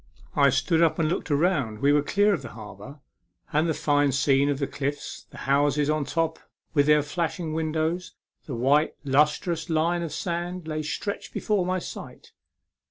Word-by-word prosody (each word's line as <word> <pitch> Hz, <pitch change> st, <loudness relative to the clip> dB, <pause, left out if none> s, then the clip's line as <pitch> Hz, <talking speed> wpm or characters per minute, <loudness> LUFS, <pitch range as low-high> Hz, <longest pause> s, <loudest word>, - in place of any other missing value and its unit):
I 140 Hz, -1 st, +5 dB
stood 140 Hz, +6 st, +2 dB
up 165 Hz, -2 st, +4 dB
to 165 Hz, -, 0 dB
look 165 Hz, +2 st, -1 dB
around. 145 Hz, -, +1 dB
We 140 Hz, +6 st, +3 dB
were 145 Hz, -, +4 dB
clear 205 Hz, +7 st, +2 dB
of 175 Hz, -, -1 dB
66 -, -, -9 dB
A -, -, -12 dB
MEMORABLE 105 Hz, -3 st, -9 dB
SWIM. -, -, -22 dB
the 100 Hz, -, -10 dB
harbour; -, -, -25 dB, 0.5 s
and 155 Hz, +3 st, +2 dB
the -, -, +2 dB
fine 145 Hz, -1 st, +2 dB
scene 135 Hz, +1 st, +3 dB
of 140 Hz, -, 0 dB
the 140 Hz, -, -1 dB
cliffs, 145 Hz, +1 st, -5 dB
the -, -, -13 dB
houses 145 Hz, +2 st, +2 dB
on 155 Hz, -2 st, 0 dB
top, 160 Hz, +2 st, -1 dB, 0.3 s
with 145 Hz, -1 st, +3 dB
their 150 Hz, -1 st, +5 dB
flashing 165 Hz, +1 st, -3 dB
windows, 160 Hz, +2 st, -2 dB, 0.3 s
the 135 Hz, -, -4 dB
white 140 Hz, +6 st, +2 dB
lustrous 150 Hz, +5 st, +1 dB
line 165 Hz, +2 st, +1 dB
of 165 Hz, -3 st, -4 dB
sands, 175 Hz, 0 st, -3 dB
lay 155 Hz, -1 st, -2 dB
stretched 155 Hz, +7 st, -4 dB
before 200 Hz, -4 st, 0 dB
my 185 Hz, 0 st, +1 dB
sight. 180 Hz, -, -9 dB
155 Hz, 195 wpm, -26 LUFS, 140-170 Hz, 0.5 s, I